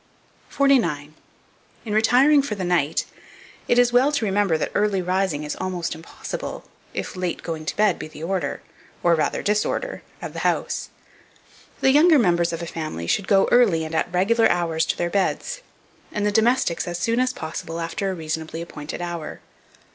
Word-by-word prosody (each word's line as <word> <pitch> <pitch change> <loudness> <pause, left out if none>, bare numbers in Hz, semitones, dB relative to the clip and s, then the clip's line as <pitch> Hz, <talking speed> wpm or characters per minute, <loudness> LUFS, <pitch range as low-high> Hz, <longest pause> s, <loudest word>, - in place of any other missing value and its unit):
49. 170 - +2 0.7
IN 210 - -3
RETIRING 250 +7 +5
FOR 245 -6 -3
THE 190 - -4
NIGHT, 170 -4 +1 0.6
it 240 - +3
is 245 -1 +4
well 260 +4 +4
to 260 -6 0
remember 195 -4 +2
that - - -2
early 205 -2 +1
rising 185 -4 0
is 150 - -4
almost 185 -2 -3
impossible, 160 +1 -7 0.3
if - - -5
late 180 -2 -3
going 160 -2 -5
to - - -3
bed 210 -4 +3
be - - -6
the 155 0 -10
order, 190 +2 -2 0.4
or 170 - +5
rather 155 -2 0
disorder, 210 - -1 0.2
of - - -7
the - - -5
house. - - -1 0.9
The 265 - +5
younger 310 +3 +6
members 175 -7 +2
of 165 0 -4
a - - -3
family 155 - -5
should 185 - 0
go 195 -1 +4
early 200 -10 +4
and 155 - -7
at 160 - 0
regular 220 +6 +3
hours 165 -2 0
to - - -1
their 175 0 -1
beds, - - -1 0.5
and 210 -1 -1
the 210 - +2
domestics 220 -5 +2
as 175 0 -3
soon 230 +6 0
as 255 0 +2
possible 165 -3 -6
after 170 +4 -2
a 190 - -2
reasonably 160 0 -4
appointed 150 0 -7
hour. 170 -3 -5
185 Hz, 175 wpm, -23 LUFS, 165-225 Hz, 0.9 s, younger